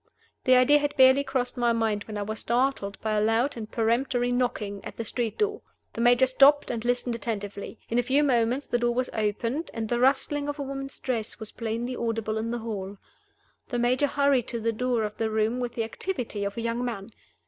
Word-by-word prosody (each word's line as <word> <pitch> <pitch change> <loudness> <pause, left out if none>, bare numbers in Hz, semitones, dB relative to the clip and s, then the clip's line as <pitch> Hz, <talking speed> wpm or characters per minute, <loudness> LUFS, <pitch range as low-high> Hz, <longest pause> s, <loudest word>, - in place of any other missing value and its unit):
The 255 - +6
idea 255 +4 +6
had 290 0 -2
barely 260 +1 +6
crossed 260 -2 -2
my 240 -1 +2
mind 220 -3 0
when 215 -1 -6
I 205 - -2
was 215 +2 -5
startled 240 -5 0
by 220 - -1
a 210 0 +2
loud 225 +6 +2
and 220 -2 -6
peremptory 245 +2 +1
knocking 215 -5 -1
at - - -8
the 230 - -4
street 230 0 -2
door. 420 0 0 0.3
The 230 - -3
Major 245 +2 +5
stopped 275 +3 +5
and 230 -2 -3
listened 245 0 0
attentively. 205 -2 -5
In 235 - +1
a - - +5
few 265 +4 +2
moments 250 0 +1
the 240 - 0
door 240 0 +1
was 255 0 -1
opened, 230 +8 -1
and 225 -1 -2
the 240 - 0
rustling 285 +3 +2
of 290 - -4
a 285 - -3
woman's 275 0 -6
dress 235 -4 -3
was 220 -1 -6
plainly 230 +2 -3
audible 225 -2 -2
in 225 +1 -3
the 240 - -2
hall. 205 -4 -5 0.7
The 245 - -3
Major 250 +4 +2
hurried 280 -4 +2
to 235 - -3
the 225 +1 0
door 245 0 0
of 210 0 -4
the 225 -1 0
room 220 +3 0
with 245 -1 -3
the 230 - 0
activity 225 - -4
of 200 +2 -4
a - - -2
young 230 +1 -1
man. 230 -3 -4
240 Hz, 220 wpm, -27 LUFS, 220-260 Hz, 0.7 s, The